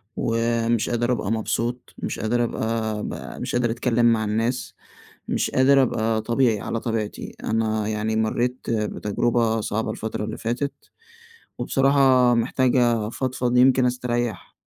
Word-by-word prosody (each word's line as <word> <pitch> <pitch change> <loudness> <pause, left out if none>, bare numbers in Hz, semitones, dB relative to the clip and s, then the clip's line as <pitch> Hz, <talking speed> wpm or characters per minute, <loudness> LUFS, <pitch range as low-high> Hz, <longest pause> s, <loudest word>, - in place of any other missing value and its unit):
ومش 115 0 0
قادر 120 +1 0
أبقى 110 -4 -1
مبسوط، 115 +2 -2
مش - - -4
قادر 120 +2 +1
أبقى 110 -2 -2
أبقى - - -6
مش - - -3
قادر 120 -1 +1
أتكلم 120 0 +1
مع 110 -1 0
الناس، 115 +4 -2 0.5
مش - - 0
قادر 135 +1 +5
أبقى 110 -3 0
طبيعي، 115 -2 +1
على 115 - -3
طبيعتي. 110 -3 -4
أنا 110 -1 0
يعني 110 +1 -1
مريت 120 +3 -1
بتجربة 115 +1 0
صعبة 110 +1 -2
الفترة 110 -1 -4
اللي - - -5
فاتت 120 +5 -2 0.9
وبصراحة 135 -2 +4
محتاج 125 +2 +1
أفضفض 120 +1 0
يمكن 130 0 +5
أستريّح. 120 -2 -2
115 Hz, 130 wpm, -23 LUFS, 110-125 Hz, 0.9 s, قادر